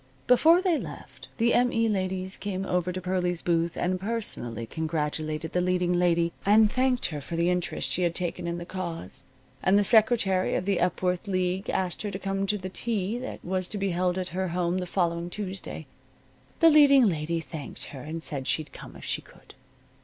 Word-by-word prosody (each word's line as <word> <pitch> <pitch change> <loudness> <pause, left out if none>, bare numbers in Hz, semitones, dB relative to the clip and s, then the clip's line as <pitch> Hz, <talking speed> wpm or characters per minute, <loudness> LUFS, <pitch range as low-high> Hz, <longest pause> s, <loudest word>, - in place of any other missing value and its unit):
Before 325 +8 +5
they 350 -5 +2
left, - - -9
the 235 0 +3
M. 245 0 +3
E. 230 0 +2
ladies 190 -2 -2
came 195 -1 -4
over 180 -1 0
to 185 - -4
Pearlie's 180 -1 -1
booth 170 0 0
and 185 +1 -1
personally 190 - -4
congratulated 155 +1 -2
the 180 - +1
leading 180 0 +1
lady, 170 -1 +2
and 210 +1 +5
thanked 255 -1 +1
her 150 -3 -5
for 165 - -6
the 170 +1 +2
interest 180 -1 -1
she 185 - 0
had 170 -1 +1
taken 175 -1 -2
in 170 0 -2
the 175 - -6
cause, 175 - -6 0.4
and 195 +2 +4
the 205 - +4
secretary 215 -3 +4
of 180 - -1
the 195 -2 +1
Epworth 180 +2 0
League 185 0 -1
asked 185 -2 -1
her 210 - -3
to 195 - -4
come 195 0 -2
to 210 - +1
the 185 -1 -6
tea 215 +2 -2
that 260 - -7
was 185 0 -1
to 210 - -2
be 195 -1 0
held 180 +1 0
at 185 -1 -2
her 185 +1 -2
home 175 +1 0
the 180 - -4
following 170 -1 -1
Tuesday. 195 0 -6 0.8
The 330 -1 +8
leading 280 -5 +7
lady 165 -1 -1
thanked 160 -3 -7
her 135 - -7
and 160 +3 -6
said 135 -4 -5
she'd 155 -2 -1
come - - -11
if - - -10
she - - -2
could. - - -18
185 Hz, 200 wpm, -27 LUFS, 170-200 Hz, 0.8 s, The